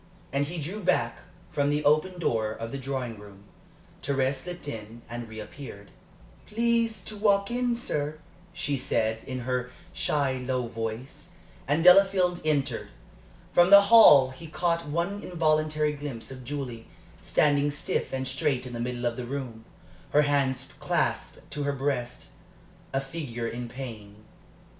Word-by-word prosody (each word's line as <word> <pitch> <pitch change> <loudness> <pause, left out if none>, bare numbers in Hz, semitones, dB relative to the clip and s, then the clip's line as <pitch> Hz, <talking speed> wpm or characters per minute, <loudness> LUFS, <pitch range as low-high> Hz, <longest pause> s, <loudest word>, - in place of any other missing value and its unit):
And 140 +1 +2
he 170 +4 -6
drew 190 +8 -5
back 185 - +1 0.3
from 145 0 +1
the 150 +1 0
open 155 +5 +3
door 110 -9 0
of 115 +1 -6
the 140 - -4
drawing 130 -4 -4
room. 100 -1 -14 0.6
Thérèse 135 -1 +1
slipped 175 +3 -8
in, 115 -2 -7
and 120 +1 -6
reappeared. 110 -1 -9 0.6
"Please 230 0 +1
to 215 - -7
walk 200 0 +2
in, 245 0 +1
sir," 155 - -2 0.3
she 145 -4 -2
said, 110 -4 0
in 130 -1 -4
her 125 0 -2 0.2
shy, 140 -3 0
low 125 -1 -1
voice, 115 +3 -6 0.3
and 150 +4 +2
Delafield 180 -1 +6
entered. 140 -6 0 0.7
From 175 +1 +6
the 200 0 +10
hall 140 - +9
he 145 +6 -11
had 155 - -12
caught 170 -1 0
one 170 +7 -2
involuntary 155 -3 +1
glimpse 140 -5 -6
of 130 -1 -9
Julie, 125 -4 -5 0.3
standing 145 -1 +3
stiff 145 - -2
and 130 0 -2
straight 130 -1 0
in 125 - -7
the 120 - -5
middle 120 0 -3
of 120 -1 -1
the 125 - -4
room, 120 -4 -6 0.5
her 150 - +6
hands 135 -2 0
clasped - - -1
to 145 - -4
her 145 0 0
breast 135 -3 -3 0.6
a 135 - +1
figure 135 -5 -5
in 120 +1 -5
pain. 115 -6 -8
140 Hz, 150 wpm, -27 LUFS, 120-160 Hz, 0.7 s, the